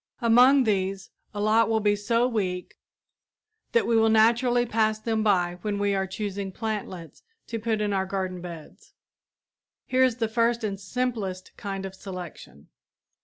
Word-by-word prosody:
Among 250 +3 +6
these 195 -3 -1 0.2
a 205 - -6
lot 215 +2 +3
will 220 -1 +2
be 205 -1 +2
so 230 +4 +1
weak 185 -7 -3 1.0
that 470 - +3
we 235 - +1
will 225 0 +4
naturally 240 +2 +3
pass 220 -1 +1
them 220 0 -1
by 180 -4 +1
when 205 0 -2
we 200 0 +1
are 190 -1 -1
choosing 200 0 -4
plantlets 200 -6 -5 0.2
to 230 - -5
put 220 -1 -1
in 205 -1 0
our 190 -1 0
garden 185 -2 -3
beds. 170 -3 -11 0.9
Here 260 0 +2
is 255 -3 +3
the 230 -2 -1
first 230 +1 +1
and 200 -2 -3
simplest 200 -4 -3
kind 195 -1 -5
of 190 - -7
selection. 180 - -10
210 Hz, 160 wpm, -26 LUFS, 190-230 Hz, 1.0 s, Among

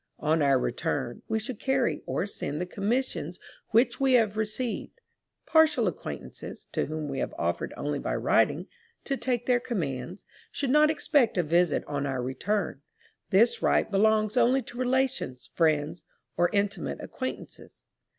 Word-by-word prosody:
On 155 +1 +1
our 140 -2 +4
return, 120 -1 -2
we 220 - 0
should 220 +1 -5
carry 265 -2 +1
or - - -1
send 155 -6 -4
the 180 - -1
commissions 225 +8 -2 0.3
which 235 +2 +3
we 270 -1 +3
have 220 -4 +4
received. 220 - -3 0.5
Partial 310 -8 +4
acquaintances, 110 - -6
to - - -1
whom 155 0 -4
we 135 -2 -3
have - - -3
offered - - -1
only - - -2
by - - -2
writing, - - +2 0.4
to 275 - -1
take 245 -3 -1
their 250 -1 +3
commands, 175 - -4 0.3
should 275 -3 -1
not 300 +2 +6
expect 290 -7 +2
a 180 - +3
visit 170 +1 +2
on 145 -1 -2
our 130 -2 -2
return; 155 +4 -2 0.5
this 225 +5 +4
right - - +2
belongs 215 +2 +3
only 250 +2 +4
to 245 - -10
relations, 255 - -1
friends, 155 0 +1 0.3
or 175 0 +3
intimate 200 -2 -1
acquaintances. 260 0 -7
210 Hz, 150 wpm, -28 LUFS, 155-250 Hz, 0.5 s, not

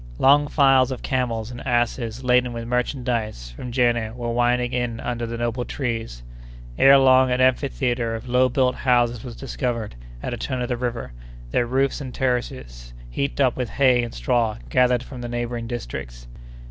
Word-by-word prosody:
Long 145 +2 +5
files 135 -3 +4
of 130 - -6
camels 120 -4 -1
and 120 +1 -8
asses 120 -1 -1
laden 125 -1 +2
with 115 0 -5
merchandise 120 - -2
from 120 - -8
Jenné 120 -2 +1
were 120 -1 -3
winding 120 +1 +1
in 120 -2 -2
under 120 -1 -3
the 115 0 -5
noble 120 +1 -2
trees. 115 - -4 0.5
Ere 135 - +7
long, 130 -1 +5
an 125 0 0
amphitheatre 125 -2 +1
of 115 +3 -8
low 125 +1 +3
built 125 0 +2
houses 120 -2 +2
was 120 -3 -8
discovered 120 -4 -3 0.3
at - - -3
a - - -4
turn 130 +3 -3
of 120 - -4
the 125 - 0
river, 120 - -4 0.4
their 120 - +1
roofs 135 +3 0
and 130 -3 -7
terraces 65 - -3 0.2
heaped 140 - -2
up 130 -3 +3
with 125 -3 -3
hay 130 0 +3
and 120 -1 -5
straw 110 - 0
gathered 125 -1 +3
from 130 -3 -9
the 120 - -5
neighboring 120 -1 -3
districts. - - -6
120 Hz, 175 wpm, -23 LUFS, 115-130 Hz, 0.5 s, Ere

